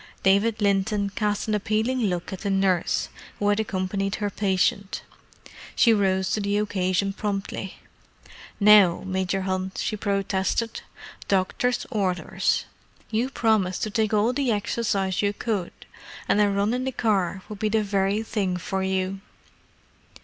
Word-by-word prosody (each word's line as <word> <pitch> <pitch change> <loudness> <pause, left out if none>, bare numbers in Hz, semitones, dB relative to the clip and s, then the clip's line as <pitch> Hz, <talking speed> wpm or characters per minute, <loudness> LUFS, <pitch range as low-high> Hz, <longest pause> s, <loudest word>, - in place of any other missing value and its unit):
David 210 +3 +3
Linton 200 0 +1
cast 210 0 -1
an 215 - 0
appealing 220 +4 0
look 185 -6 -1
at 190 - -6
the 200 - -2
nurse, 195 -3 +1 0.3
who 205 - +1
had 205 +1 +2
accompanied 195 -1 -1
her 205 -1 -2
patient. 200 +1 0 0.7
She 230 - +5
rose 190 -2 +1
to - - +1
the 200 0 0
occasion 195 -1 0
promptly. 195 -2 -4 0.8
"Now, 205 -4 +6
Major 190 0 -1
Hunt," 185 0 -3
she 215 - -1
protested. 200 +2 -1 0.5
"Doctor's 200 +6 0
orders! 190 -6 0 0.5
You 230 +4 0
promised 215 -8 +1
to 215 - -2
take 220 -1 +1
all 215 +3 +2
the 270 -2 0
exercise 205 -3 0
you 205 0 +1
could, 205 -5 -2 0.6
and 210 - +3
a 205 - +4
run 200 +3 +1
in 255 +1 -1
the 265 - -1
car 195 -6 0
would 210 -2 -8
be 215 - 0
the 220 0 +2
very 200 +1 0
thing 195 -5 -1
for 190 +2 -3
you." 190 0 -1
200 Hz, 145 wpm, -25 LUFS, 190-215 Hz, 0.8 s, Now